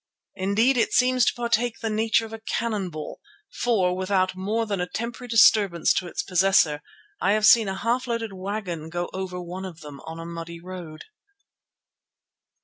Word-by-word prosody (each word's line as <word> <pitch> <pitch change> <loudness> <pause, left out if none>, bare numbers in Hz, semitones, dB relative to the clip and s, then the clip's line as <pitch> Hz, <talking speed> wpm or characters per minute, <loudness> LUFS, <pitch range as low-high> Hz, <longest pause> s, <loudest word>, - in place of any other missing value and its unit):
Indeed 220 +7 +2
it 230 - +1
seems 255 0 +4
to - - +2
partake 235 -1 0
of - - -21
the 225 - -1
nature 220 +1 +2
of 225 - -11
a 225 - -6
cannon 220 -4 -2
ball, 155 -2 -7 0.4
for, 190 -7 +2
without 185 0 0
more 210 +5 -1
than 200 -4 -2
temporary 235 +2 -5
disturbance 205 -6 +4
to 180 - -2
its - - -4
possessor, 180 -5 +3 0.4
I 200 - +3
have 215 0 +2
seen 225 -2 +7
a 190 - -3
half 245 +4 -1
loaded 230 -3 -3
wagon 185 -4 -5
go 175 +1 -4
over 185 -1 -4
one 180 +2 -7
of 175 -4 -8
them 145 -2 -10
on 160 +1 -7
a 165 - -7
muddy 170 0 -7
road. 175 -3 -9
195 Hz, 175 wpm, -25 LUFS, 175-225 Hz, 0.4 s, seen